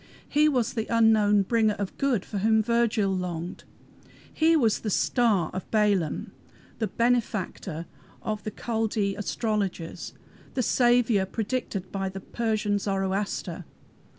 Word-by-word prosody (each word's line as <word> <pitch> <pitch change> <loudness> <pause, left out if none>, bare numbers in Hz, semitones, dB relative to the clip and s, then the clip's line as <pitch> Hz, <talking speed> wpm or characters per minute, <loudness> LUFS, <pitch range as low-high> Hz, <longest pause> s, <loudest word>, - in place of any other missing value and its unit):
He 300 +1 +4
was 250 -4 0
the 225 -2 -2
unknown 215 -3 +4
bringer 220 0 +2
of 200 -2 -4
good 255 -8 +1
for 205 - -4
whom 220 +2 +3
Virgil 225 -4 +1
longed. 175 -1 -4 0.7
He 325 +1 +4
was 225 -7 +2
the 215 - -3
"Star" 210 -5 +2
of 185 0 -6
Balaam, 205 -7 +1 0.5
the 220 - 0
"Benefactor" 215 -9 -1 0.4
of 215 -1 -3
the - - -3
Chaldee 220 -2 -1
astrologers, 205 -5 -3 0.4
the 255 - +1
"Saviour" 240 -4 +3
predicted 220 -3 -3
by 195 -1 -2
the 190 +1 -7
Persian 215 -1 -1
Zoroaster. 195 0 -2
215 Hz, 125 wpm, -26 LUFS, 195-235 Hz, 0.7 s, He